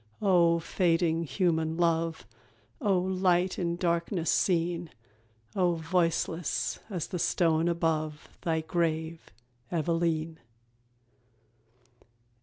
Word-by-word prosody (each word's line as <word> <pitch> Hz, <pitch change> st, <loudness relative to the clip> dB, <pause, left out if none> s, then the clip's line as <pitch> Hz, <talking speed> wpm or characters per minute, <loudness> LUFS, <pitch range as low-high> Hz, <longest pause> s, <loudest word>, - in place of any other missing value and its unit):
Oh, 175 Hz, -4 st, +4 dB
fading 165 Hz, -1 st, +1 dB
human 160 Hz, +1 st, 0 dB
love! 165 Hz, -1 st, 0 dB, 0.6 s
Oh, 200 Hz, -6 st, +2 dB
light 185 Hz, -1 st, +1 dB
in 170 Hz, -1 st, -1 dB
darkness 170 Hz, 0 st, 0 dB
seen! 170 Hz, -1 st, +1 dB, 0.7 s
Oh, 180 Hz, -3 st, +2 dB
voiceless 165 Hz, -1 st, -1 dB
as 180 Hz, -6 st, -3 dB
the 180 Hz, -, -5 dB
stone 165 Hz, -1 st, +2 dB
above 155 Hz, -3 st, -1 dB
Thy 160 Hz, -1 st, 0 dB
grave, 160 Hz, -1 st, -2 dB, 0.4 s
Eveleen! 165 Hz, -1 st, -1 dB
170 Hz, 85 wpm, -29 LUFS, 160-175 Hz, 0.7 s, Oh